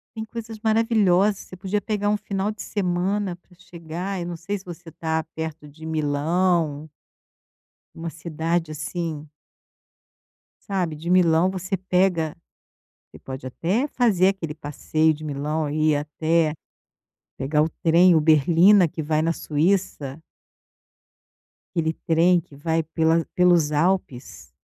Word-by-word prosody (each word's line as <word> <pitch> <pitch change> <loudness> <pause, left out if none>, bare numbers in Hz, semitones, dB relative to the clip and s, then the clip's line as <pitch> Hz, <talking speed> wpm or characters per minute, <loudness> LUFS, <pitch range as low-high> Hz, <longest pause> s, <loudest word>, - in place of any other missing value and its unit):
Tem 220 0 -4
coisas 225 0 -7
maravilhosas. 215 -3 +3
Você - - -12
podia 195 +2 -2
pegar 205 -1 -1
um 210 - +2
final 200 0 -2
de 215 - -9
semana 190 0 -1
para 180 +1 -24
chegar. 175 +2 -6
Eu 170 - -4
não 175 - -4
sei 200 +5 -4
se 195 - -15
você 175 -1 -9
está 160 0 -2
perto 160 -1 -5
de 155 +2 -13
Milão 155 0 0 1.1
uma 165 0 -5
cidade 165 +1 -2
assim 155 0 -4 1.4
sabe. 180 -6 -1
De 165 +3 -6
Milão, 175 -1 +4
você 190 +1 -3
pega 180 -4 +1 0.8
você - - -14
pode 130 0 -8
até 185 - -1
fazer 210 -9 +3
aquele 175 -6 -3
passeio 155 +1 0
de 155 0 -9
Milão 150 +1 -2
e 155 +1 +1
ir 150 - +2
até 155 +2 0 0.8
pegar 150 +3 +1
o 155 - +1
trem, 170 +2 +5
o 160 - +4
Berlina, 165 +6 +5
que 160 0 -5
vai 155 +1 0
na 165 - +1
Suíça. 155 -3 -1 1.6
Aquele 160 -1 0
trem 170 +2 +4
que 155 -3 -15
vai 160 +3 0
pela 160 +1 +1
pelos 175 -4 +4
Alpes. 150 -5 -1
165 Hz, 135 wpm, -23 LUFS, 155-185 Hz, 1.6 s, trem